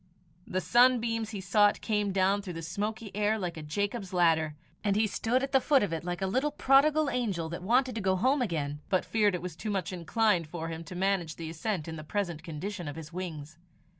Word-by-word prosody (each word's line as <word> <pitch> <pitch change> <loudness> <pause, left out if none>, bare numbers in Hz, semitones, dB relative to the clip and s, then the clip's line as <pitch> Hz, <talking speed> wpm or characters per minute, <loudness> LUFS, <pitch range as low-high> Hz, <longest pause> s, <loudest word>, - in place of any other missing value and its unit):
The 185 0 -1
sunbeams 235 -1 +3
he 210 -3 -5
sought 205 +2 +3
came 210 -2 0
down 195 +1 +2
through 190 -3 -6
the 165 - -6
smoky 210 +5 -4
air 210 +1 +2
like 180 -4 -3
a 160 - -7
Jacob's 200 +6 -3
ladder, 160 -3 +3 0.3
and 200 -1 +1
he 215 +1 +3
stood 235 +5 0
at 270 - -2
the 270 -1 +4
foot 275 -3 +4
of 195 - -1
it 165 - -3
like 175 +1 -3
a - - +2
little 260 +10 +1
prodigal 295 +2 +4
angel 205 -11 -1
that 170 +2 -5
wanted 250 +6 +2
to 220 - -3
go 190 -1 +2
home 260 +8 +2
again, 150 -9 -2
but 185 - +1
feared 210 -4 +2
it 175 - -5
was 180 -3 -5
too 215 - -5
much 195 -3 -2
inclined 180 0 +1
for 165 +1 -5
him 165 0 -5
to 180 - -8
manage 185 -4 0
the 160 -1 -6
ascent 170 0 -3
in 160 0 -5
the 155 - -7
present 170 -2 -2
condition 175 +3 -5
of 145 - -5
his 160 0 -9
wings. 160 -3 -6
190 Hz, 225 wpm, -29 LUFS, 165-220 Hz, 0.3 s, the